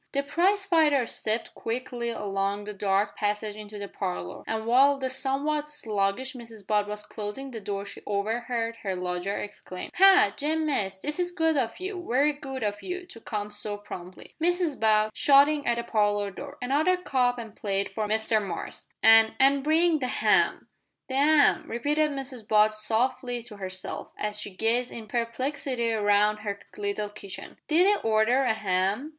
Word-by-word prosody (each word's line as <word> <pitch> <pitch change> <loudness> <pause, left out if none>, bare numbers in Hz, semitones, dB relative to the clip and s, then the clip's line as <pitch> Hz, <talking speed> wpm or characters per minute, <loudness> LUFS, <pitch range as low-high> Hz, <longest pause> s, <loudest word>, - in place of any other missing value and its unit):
The 280 0 +1
prize 375 +7 +1
fighter 310 -8 +3
stepped 220 0 -2
quickly 240 0 -4
along 200 -2 -2
the 210 0 -6
dark 200 0 0
passage 210 0 -2
into 210 0 -9
the 200 0 -5
parlour, 90 - -5
and 220 0 -2
while 270 +4 +5
the 260 -1 -2
somewhat 280 +3 0
sluggish 225 -3 -1
Mrs 230 -5 -10
Butt 210 0 +1
was 210 0 -5
closing 220 +7 -6
the 230 - -6
door 200 0 -4
she - - -9
overheard 230 +3 -2
her 195 -4 -3
lodger 180 +2 -3
exclaim 185 -3 -7
"Ha! 390 +3 +7
Jem 315 +2 0
Mace, 200 -10 0
this 295 - -3
is 355 0 +1
good 325 -3 +1
of 235 -5 -1
you 370 -1 -5
very 280 +5 +3
good 270 -3 -6
of 205 -1 -2
you 360 0 -5
to 230 -10 -13
come 210 -2 -4
so 210 0 -2
promptly. 185 -3 -10
Mrs 350 -3 +1
Butt," 215 -1 +3
shouting 285 +1 +5
at 240 - +3
the 235 - -2
parlour 205 -3 +1
door, 280 +8 -9
"another 305 +8 +2
cup 255 -8 +1
and 225 -3 -8
plate 195 -1 -2
for 215 +2 -2
Mr 220 0 +1
Mace, 195 -4 -6 0.2
and 225 0 +7
and 275 +1 +4
bring 320 +2 +3
the 255 - -1
ham!" - - +2 0.4
"The - - -4
'am!" 295 +1 +4
repeated 295 +6 +1
Mrs 265 -5 -6
Butt 215 0 +4
softly 240 +3 -1
to 220 -3 -11
herself, 190 -1 -6
as 210 0 -3
she - - -5
gazed 235 +4 +1
in 225 -2 -8
perplexity 245 +1 -2
round 210 -1 +2
her 205 -1 -4 0.2
little 205 0 -3
kitchen, 200 -2 -9
"did 325 +4 +4
'e 410 +1 +3
order 225 +4 +3
a 235 - +3
'am?" 200 +6 0
230 Hz, 175 wpm, -27 LUFS, 210-280 Hz, 0.4 s, Ha